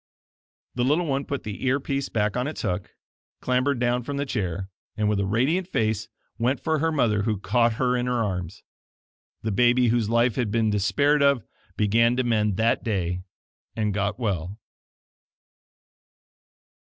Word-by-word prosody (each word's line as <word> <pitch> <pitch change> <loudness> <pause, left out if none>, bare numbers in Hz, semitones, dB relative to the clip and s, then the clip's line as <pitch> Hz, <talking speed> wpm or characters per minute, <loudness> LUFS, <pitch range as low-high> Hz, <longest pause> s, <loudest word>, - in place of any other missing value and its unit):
The 125 - -1
little 150 +7 +2
one 140 -2 -1
put 140 - -4
the 105 +2 -6
ear 130 +1 +2
piece 140 0 -2
back 105 -2 0
on 125 +2 -1
its 155 - -5
hook, 90 +1 -3 0.4
clambered 130 +2 +1
down 120 0 +1
from 140 +4 -5
the 140 - -1
chair, 95 -7 -3 0.3
and 105 -1 +1
with 105 -1 +1
a 100 - 0
radiant 140 - +1
face, 110 - -1 0.3
went 125 +4 +1
for 160 -1 0
her 165 +2 +1
mother, 115 -9 +2
who 110 0 0
caught 115 +3 +2
her 125 +2 +1
in 125 0 -1
her 120 -2 +1
arms. 95 -2 -4 0.8
The 110 - -1
baby 120 +3 +4
whose 115 -2 +1
life 115 0 +2
had 120 -4 0
been 110 0 +1
despaired 140 +9 +2
of, 140 -5 +3 0.3
began 115 +3 +3
to 130 - +1
mend 105 -5 +1
that 115 +1 +2
day 90 -5 -1 0.5
and 105 -2 0
got 100 0 -1
well. 100 -4 -2
115 Hz, 165 wpm, -25 LUFS, 105-130 Hz, 0.8 s, baby